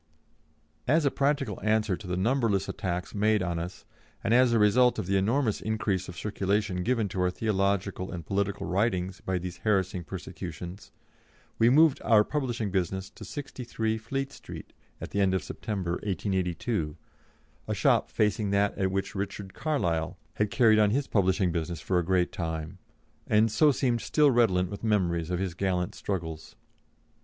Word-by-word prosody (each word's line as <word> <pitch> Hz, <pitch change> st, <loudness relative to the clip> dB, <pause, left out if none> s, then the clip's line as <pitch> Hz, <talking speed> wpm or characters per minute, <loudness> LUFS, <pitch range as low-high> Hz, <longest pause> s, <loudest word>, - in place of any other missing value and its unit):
As 155 Hz, +4 st, +3 dB
a 140 Hz, -, +3 dB
practical 140 Hz, -7 st, 0 dB
answer 110 Hz, -2 st, +2 dB
to 95 Hz, -, -10 dB
the 90 Hz, 0 st, -2 dB
numberless 110 Hz, -2 st, +1 dB
attacks 90 Hz, -1 st, -3 dB
made 105 Hz, 0 st, +2 dB
on 85 Hz, -2 st, -2 dB
us, 90 Hz, +2 st, -7 dB, 0.4 s
and 110 Hz, -, +2 dB
as 125 Hz, 0 st, +5 dB
a 115 Hz, -, +3 dB
result 120 Hz, +4 st, +4 dB
of -, -, -2 dB
the 100 Hz, +2 st, 0 dB
enormous 110 Hz, +4 st, +1 dB
increase 105 Hz, -4 st, -1 dB
of 90 Hz, -, -9 dB
circulation 100 Hz, -2 st, -1 dB
given 115 Hz, +1 st, +1 dB
to 90 Hz, -, -2 dB
our 90 Hz, -, +3 dB
theological 100 Hz, -1 st, -1 dB
and 85 Hz, -3 st, -6 dB
political 100 Hz, +1 st, -1 dB
writings 95 Hz, -1 st, 0 dB
by 95 Hz, -1 st, -1 dB
these 90 Hz, 0 st, -5 dB
harassing 95 Hz, -4 st, 0 dB
persecutions, 90 Hz, +1 st, -7 dB, 0.7 s
we 115 Hz, -, +6 dB
moved 150 Hz, +2 st, +5 dB
our 110 Hz, -1 st, +5 dB
publishing 120 Hz, -7 st, -2 dB
business 95 Hz, 0 st, -2 dB
to -, -, -12 dB
63, 115 Hz, -3 st, -3 dB
Fleet 135 Hz, +5 st, -3 dB
Street, -, -, -10 dB, 0.3 s
at -, -, -7 dB
the 100 Hz, -, 0 dB
end 95 Hz, -1 st, +3 dB
of 95 Hz, -, -1 dB
September, 95 Hz, -5 st, -4 dB
1882, 95 Hz, -2 st, -2 dB, 0.7 s
a -, -, -1 dB
shop -, -, +3 dB
facing 105 Hz, 0 st, +1 dB
that 100 Hz, 0 st, +2 dB
at 95 Hz, -1 st, +2 dB
which 95 Hz, 0 st, -2 dB
Richard 100 Hz, -1 st, -5 dB
Carlile 85 Hz, -, -1 dB, 0.2 s
had 105 Hz, -1 st, 0 dB
carried 110 Hz, +1 st, +5 dB
on 105 Hz, -1 st, +5 dB
his 135 Hz, +6 st, +1 dB
publishing 95 Hz, -4 st, +2 dB
business 85 Hz, 0 st, -3 dB
for 90 Hz, +3 st, +1 dB
a -, -, 0 dB
great 90 Hz, 0 st, +1 dB
time, 80 Hz, +1 st, -4 dB, 0.5 s
and 110 Hz, +1 st, +3 dB
so 150 Hz, +6 st, +5 dB
seemed 125 Hz, -4 st, 0 dB
still 150 Hz, -2 st, +3 dB
redolent 95 Hz, -7 st, +2 dB
with 100 Hz, -, -7 dB
memories 90 Hz, -7 st, +1 dB
of 90 Hz, -, 0 dB
his 95 Hz, -1 st, -2 dB
gallant 90 Hz, -1 st, -1 dB
struggles. 80 Hz, -5 st, -5 dB
100 Hz, 165 wpm, -28 LUFS, 90-110 Hz, 0.7 s, we